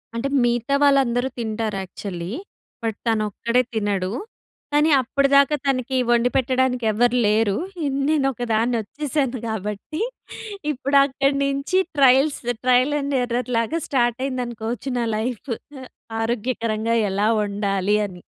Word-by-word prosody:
అంటే 230 Hz, +4 st, -1 dB, 0.2 s
మిగతా 240 Hz, +3 st, +1 dB
వాళ్ళందరూ 265 Hz, -3 st, +3 dB
తింటారు 220 Hz, -2 st, -2 dB
యక్చువల్లీ. 180 Hz, -1 st, -6 dB, 0.5 s
బట్ 225 Hz, -2 st, -2 dB
తనొక్కడే 225 Hz, +2 st, +1 dB
తినడు. 200 Hz, -3 st, -1 dB, 0.6 s
కానీ 300 Hz, +2 st, +4 dB
అప్పటిదాకా 280 Hz, +3 st, +3 dB
తనకి 260 Hz, -1 st, 0 dB
వండిపెట్టడానికి 250 Hz, 0 st, +2 dB
ఎవరు 240 Hz, +3 st, +2 dB
లేరు. 210 Hz, -1 st, +2 dB, 0.3 s
ఇ -, -, 0 dB, 0.2 s
నేను 300 Hz, -3 st, +2 dB
ఒకదాన్ని 235 Hz, 0 st, 0 dB
వచ్చేశాను 270 Hz, +2 st, -2 dB
కాబట్టి 210 Hz, -, -4 dB, 0.7 s
ఇప్పుడు 280 Hz, +1 st, +1 dB
అక్కడ్నించి 275 Hz, +4 st, 0 dB, 0.2 s
ట్రయల్స్ 275 Hz, +2 st, +5 dB, 0.2 s
ట్రయల్ 255 Hz, +3 st, +3 dB
అండ్ 280 Hz, 0 st, -2 dB
ఎర్రర్ 245 Hz, +1 st, -2 dB
లాగా 265 Hz, +9 st, 0 dB
స్టార్ట్ 240 Hz, -2 st, +1 dB
అయిందనుకోవచ్చు 245 Hz, -1 st, -4 dB
నా 235 Hz, -, 0 dB
లైఫు. 240 Hz, +2 st, -3 dB, 0.3 s
అ -, -, -9 dB, 0.4 s
ఆరోగ్యకరంగా 230 Hz, -1 st, -1 dB, 0.2 s
ఎలా 205 Hz, +2 st, +1 dB
వండాలి 200 Hz, -1 st, 0 dB
అని. 180 Hz, -2 st, -12 dB
240 Hz, 115 wpm, -22 LUFS, 220-275 Hz, 0.7 s, ట్రయల్స్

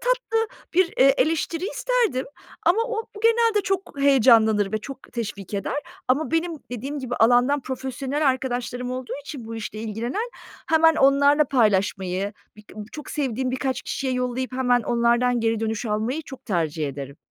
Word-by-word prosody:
tatlı 475 Hz, -3 st, 0 dB, 0.3 s
bir, 370 Hz, +1 st, +6 dB
eee, 270 Hz, +1 st, +6 dB
eleştiri 325 Hz, +2 st, 0 dB
isterdim. 485 Hz, -, 0 dB, 0.4 s
Ama 355 Hz, +5 st, +5 dB
o 460 Hz, -2 st, -2 dB, 0.2 s
genelde 460 Hz, -2 st, +4 dB
çok 390 Hz, 0 st, -2 dB
heyecanlanır 225 Hz, -7 st, +5 dB
ve 215 Hz, -, +1 dB
çok 270 Hz, +4 st, -10 dB
teşvik 205 Hz, -4 st, -5 dB
eder. 200 Hz, +7 st, -2 dB, 0.3 s
Ama 280 Hz, +5 st, +1 dB
benim 330 Hz, +2 st, 0 dB, 0.2 s
dediğim 270 Hz, +5 st, -4 dB
gibi 255 Hz, -2 st, -4 dB
alandan 245 Hz, +5 st, +4 dB
profesyonel 265 Hz, +3 st, -2 dB
arkadaşlarım 250 Hz, -1 st, -2 dB
olduğu 255 Hz, 0 st, -5 dB
için 280 Hz, -4 st, -8 dB
bu 225 Hz, +1 st, -7 dB
işle 215 Hz, -1 st, -6 dB
ilgilenen. 235 Hz, -, -3 dB, 0.4 s
Hemen 325 Hz, 0 st, +5 dB
onlarla 285 Hz, +2 st, +5 dB
paylaşmayı 200 Hz, -5 st, +1 dB, 0.2 s
birk 210 Hz, -1 st, -16 dB, 0.2 s
çok 300 Hz, -, -8 dB
sevdiğim 260 Hz, -3 st, -1 dB
birkaç 260 Hz, 0 st, -2 dB
kişiye 265 Hz, -1 st, -2 dB
yollayıp 250 Hz, +1 st, -2 dB
hemen 245 Hz, -2 st, +2 dB
onlardan 240 Hz, +2 st, +2 dB
geri 225 Hz, -1 st, 0 dB
dönüş 225 Hz, +1 st, -2 dB
almayı 220 Hz, +9 st, -1 dB
çok 265 Hz, -2 st, -11 dB
tercih 160 Hz, -6 st, -1 dB
ederim. 140 Hz, 0 st, -7 dB
255 Hz, 150 wpm, -24 LUFS, 225-295 Hz, 0.4 s, bir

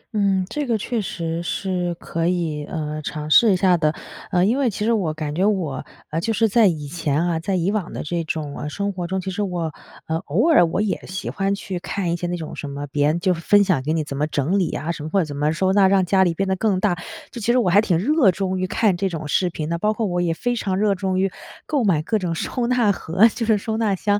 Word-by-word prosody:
嗯， 195 Hz, -2 st, +2 dB
这 295 Hz, +2 st, -3 dB
个 230 Hz, -, +1 dB
确 230 Hz, +2 st, -2 dB
实 165 Hz, -3 st, -3 dB
是， 180 Hz, -1 st, -2 dB
可 165 Hz, 0 st, -3 dB
以， 165 Hz, -4 st, -1 dB
呃， 155 Hz, -1 st, -4 dB
尝 150 Hz, +1 st, -5 dB
试 225 Hz, +4 st, +7 dB
一 190 Hz, -, +4 dB
下 185 Hz, 0 st, +4 dB
的。 155 Hz, -1 st, +1 dB, 0.3 s
呃， 180 Hz, 0 st, +3 dB
因 240 Hz, +7 st, +2 dB
为 260 Hz, -, +2 dB
其 210 Hz, 0 st, -3 dB
实 230 Hz, -, +3 dB
我 185 Hz, -8 st, 0 dB
感 155 Hz, -1 st, -4 dB
觉 180 Hz, +5 st, 0 dB
我 180 Hz, -10 st, 0 dB, 0.3 s
呃， 165 Hz, -, -1 dB
就 225 Hz, -, -1 dB
是 225 Hz, +2 st, +3 dB
在 220 Hz, 0 st, +4 dB
以 155 Hz, -4 st, -1 dB
前 155 Hz, 0 st, -1 dB
啊 170 Hz, -2 st, 0 dB
在 190 Hz, +3 st, -2 dB
以 180 Hz, +2 st, +1 dB
往 205 Hz, -5 st, -2 dB
的 -, -, -4 dB
这 170 Hz, +2 st, -2 dB
种， 155 Hz, -2 st, -4 dB
啊， 150 Hz, -, -5 dB
生 200 Hz, +5 st, -2 dB
活 180 Hz, -2 st, -4 dB
中， 190 Hz, +2 st, -2 dB
其 190 Hz, +1 st, -4 dB
实 205 Hz, -, -3 dB
我 175 Hz, -6 st, -2 dB, 0.3 s
呃， 160 Hz, 0 st, -1 dB
偶 200 Hz, -, +2 dB
尔 175 Hz, -, +6 dB
我 165 Hz, -, -2 dB
也 210 Hz, -, -1 dB
喜 190 Hz, +2 st, -4 dB
欢 195 Hz, 0 st, 0 dB
去 190 Hz, -3 st, -5 dB
看 180 Hz, -2 st, -2 dB
一 -, -, +1 dB
些 175 Hz, 0 st, -3 dB
那 175 Hz, 0 st, -2 dB
种， 160 Hz, -, -7 dB
什 145 Hz, -, -6 dB
么 140 Hz, +1 st, -5 dB
别 145 Hz, +1 st, +1 dB
人 155 Hz, +3 st, +1 dB
就 180 Hz, +1 st, +2 dB
是 170 Hz, -, -6 dB
分 205 Hz, +4 st, +5 dB
享 185 Hz, -9 st, +1 dB
给 150 Hz, +4 st, -2 dB
你 160 Hz, -2 st, 0 dB
怎 140 Hz, -, -6 dB
么 150 Hz, +2 st, 0 dB
整 155 Hz, +6 st, 0 dB
理 180 Hz, -, 0 dB
啊， 160 Hz, +3 st, -2 dB
什 160 Hz, -, -6 dB
么 155 Hz, -, -5 dB
或 195 Hz, -, 0 dB
者 180 Hz, -, +1 dB
怎 145 Hz, -2 st, -7 dB
么 150 Hz, +2 st, +1 dB
收 190 Hz, +3 st, +1 dB
纳 195 Hz, -2 st, +5 dB
让 190 Hz, -1 st, +3 dB
家 190 Hz, +1 st, +4 dB
里 170 Hz, -2 st, +1 dB
变 195 Hz, +2 st, -1 dB
得 190 Hz, -, +1 dB
更 195 Hz, -2 st, +1 dB
大， 200 Hz, -3 st, +2 dB, 0.4 s
就 235 Hz, -, -7 dB
其 235 Hz, -, +2 dB
实 245 Hz, -, +3 dB
我 235 Hz, -7 st, +2 dB
还 205 Hz, +4 st, +6 dB
挺 180 Hz, -6 st, +1 dB
热 265 Hz, -, +3 dB
衷 190 Hz, 0 st, -2 dB
于 185 Hz, -, -1 dB
看 215 Hz, -1 st, +2 dB
这 190 Hz, +2 st, -1 dB
种 160 Hz, -3 st, -5 dB
视 180 Hz, +5 st, +1 dB
频 155 Hz, -2 st, -5 dB
的。 170 Hz, 0 st, -2 dB
包 215 Hz, +2 st, +1 dB
括 220 Hz, 0 st, -2 dB
我 175 Hz, -2 st, 0 dB
也 170 Hz, -2 st, +1 dB
非 245 Hz, +5 st, -1 dB
常 190 Hz, -4 st, -1 dB
热 205 Hz, 0 st, +2 dB
衷 185 Hz, 0 st, -1 dB
于 195 Hz, 0 st, +1 dB, 0.3 s
购 290 Hz, -5 st, 0 dB
买 165 Hz, -7 st, +2 dB
各 215 Hz, +5 st, 0 dB
种 175 Hz, -3 st, -2 dB
收 240 Hz, +7 st, -2 dB
纳 240 Hz, -5 st, +3 dB
盒， 190 Hz, +4 st, +3 dB
就 230 Hz, +1 st, -4 dB
是 220 Hz, -, +4 dB
收 220 Hz, +2 st, -3 dB
纳 215 Hz, -3 st, +1 dB
箱。 205 Hz, +2 st, +1 dB
185 Hz, 305 characters per minute, -22 LUFS, 165-205 Hz, 0.4 s, 试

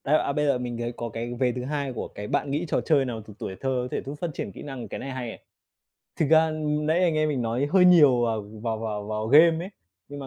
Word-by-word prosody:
Đấy, 150 Hz, +3 st, +3 dB
à, 140 Hz, -, -2 dB
bây 150 Hz, +1 st, 0 dB
giờ 140 Hz, -3 st, +2 dB
mình 120 Hz, -1 st, -4 dB
thấy 120 Hz, 0 st, -3 dB
có 120 Hz, -, -4 dB
cái 115 Hz, +2 st, -5 dB
vế 125 Hz, -2 st, +2 dB
thứ 125 Hz, +1 st, -5 dB
hai 140 Hz, -2 st, -3 dB
của 115 Hz, -, -5 dB
cái 105 Hz, -, -8 dB
bạn 140 Hz, -, -1 dB
nghĩ 150 Hz, +5 st, -1 dB
trò -, -, 0 dB
chơi 145 Hz, -4 st, +2 dB
nào 115 Hz, -3 st, -4 dB
từ 105 Hz, -, -10 dB
tuổi 95 Hz, -, -5 dB
thơ 135 Hz, -, -1 dB
có -, -, -4 dB
thể -, -, -3 dB
giúp 140 Hz, +2 st, -5 dB
phát 175 Hz, -, 0 dB
triển 100 Hz, -, -5 dB
kỹ -, -, -10 dB
năng? 135 Hz, -4 st, -7 dB
Cái -, -, -6 dB
này 135 Hz, -, -6 dB
hay 130 Hz, -2 st, -4 dB
này. -, -, -9 dB, 0.8 s
Thực 160 Hz, -, +1 dB
ra 160 Hz, +1 st, +5 dB, 0.3 s
nãy 160 Hz, +3 st, +2 dB
anh 170 Hz, -3 st, +2 dB
em 155 Hz, 0 st, +2 dB
mình 140 Hz, -5 st, -1 dB
nói 120 Hz, +4 st, 0 dB
hơi 190 Hz, -1 st, +6 dB
nhiều 150 Hz, -9 st, +6 dB
vào 110 Hz, -2 st, 0 dB, 0.2 s
vào 115 Hz, -2 st, -2 dB
vào 105 Hz, -2 st, -4 dB
vào 110 Hz, +1 st, -3 dB
game 160 Hz, +6 st, +5 dB
ấy. 190 Hz, -, -8 dB, 0.4 s
Nhưng 145 Hz, 0 st, -8 dB
mà 135 Hz, -, -7 dB
135 Hz, 285 wpm, -25 LUFS, 115-150 Hz, 0.8 s, hơi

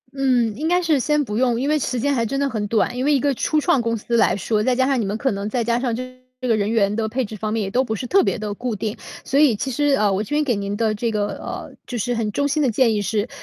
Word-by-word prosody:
嗯， 250 Hz, -5 st, +1 dB
应 310 Hz, +4 st, -2 dB
该 355 Hz, +2 st, +3 dB
是 320 Hz, -5 st, +2 dB
先 300 Hz, +3 st, +1 dB
不 210 Hz, -5 st, -4 dB
用， 245 Hz, -1 st, +2 dB
因 280 Hz, -, 0 dB
为 305 Hz, 0 st, +2 dB
时 250 Hz, -2 st, -2 dB
间 285 Hz, +4 st, +1 dB
还 235 Hz, -4 st, +1 dB
真 275 Hz, +5 st, -2 dB
的 280 Hz, 0 st, +1 dB
很 215 Hz, -4 st, -3 dB
短。 230 Hz, +3 st, 0 dB
因 255 Hz, -, -1 dB
为 295 Hz, -, +3 dB
一 280 Hz, -, +3 dB
个 280 Hz, +2 st, +1 dB
初 305 Hz, +4 st, 0 dB
创 300 Hz, -5 st, +2 dB
公 230 Hz, 0 st, -1 dB
司 235 Hz, +2 st, -1 dB
来 -, -, +3 dB
说， 210 Hz, +2 st, 0 dB
再 250 Hz, +3 st, +2 dB
加 260 Hz, +1 st, +2 dB
上 270 Hz, -1 st, +1 dB
你 220 Hz, -, 0 dB
们 200 Hz, +2 st, -2 dB
可 265 Hz, +4 st, 0 dB
能 200 Hz, 0 st, -3 dB
再 240 Hz, +1 st, 0 dB
加 235 Hz, +1 st, +1 dB
上 245 Hz, -2 st, -1 dB
这 255 Hz, +1 st, -7 dB, 0.2 s
个 240 Hz, -3 st, +1 dB
人 205 Hz, 0 st, 0 dB
员 210 Hz, -3 st, +2 dB
的 220 Hz, 0 st, -1 dB
配 255 Hz, +4 st, -1 dB
置 215 Hz, -1 st, -7 dB
方 215 Hz, +1 st, -3 dB
面， 225 Hz, -1 st, 0 dB
也 195 Hz, -, -4 dB
都 250 Hz, -, +2 dB
不 220 Hz, -4 st, -3 dB
是 235 Hz, -, -5 dB
特 390 Hz, +10 st, +4 dB
别 -, -, 0 dB
地 210 Hz, -2 st, -4 dB
固 245 Hz, +2 st, -3 dB
定。 210 Hz, +2 st, -4 dB, 0.3 s
所 275 Hz, -, +1 dB
以 290 Hz, -7 st, +5 dB
其 265 Hz, +6 st, -3 dB
实， 290 Hz, +3 st, +1 dB
呃， 210 Hz, -6 st, +2 dB
我 195 Hz, +1 st, 0 dB
这 215 Hz, -, -7 dB
边 300 Hz, +1 st, +2 dB
给 250 Hz, -5 st, +1 dB
您 200 Hz, 0 st, -3 dB
的 220 Hz, 0 st, +1 dB
这 225 Hz, +2 st, -2 dB
个， 210 Hz, -1 st, 0 dB
呃， -, -, -7 dB
就 245 Hz, -, -4 dB
是 245 Hz, +3 st, -1 dB
很 230 Hz, -2 st, -1 dB
衷 285 Hz, -, 0 dB
心 290 Hz, +2 st, +1 dB
的 275 Hz, -, +3 dB
建 230 Hz, 0 st, +3 dB
议 210 Hz, -, 0 dB
是， 210 Hz, +2 st, -1 dB
235 Hz, 345 characters per minute, -21 LUFS, 215-270 Hz, 0.3 s, 以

